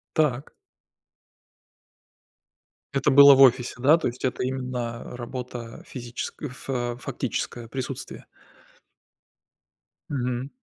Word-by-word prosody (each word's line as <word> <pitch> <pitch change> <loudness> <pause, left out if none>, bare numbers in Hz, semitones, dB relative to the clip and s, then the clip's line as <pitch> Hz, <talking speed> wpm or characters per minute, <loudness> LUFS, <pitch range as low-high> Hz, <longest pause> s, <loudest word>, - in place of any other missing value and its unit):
Так. 145 -4 0 2.4
Это 135 - +2
было 140 0 +9
в 135 - +4
офисе, 125 -2 +5
да? 145 +6 +6
То 165 - -1
есть, 120 +1 -6
это 130 - -1
именно 125 -2 -3 0.2
работа 120 -1 -7
физическ 120 +2 -7
фа 125 -2 -3
фактическая, 120 -2 -4
присутствие. 130 +1 -6 1.8
Мгм. 125 -1 -2
125 Hz, 90 wpm, -25 LUFS, 120-135 Hz, 2.4 s, было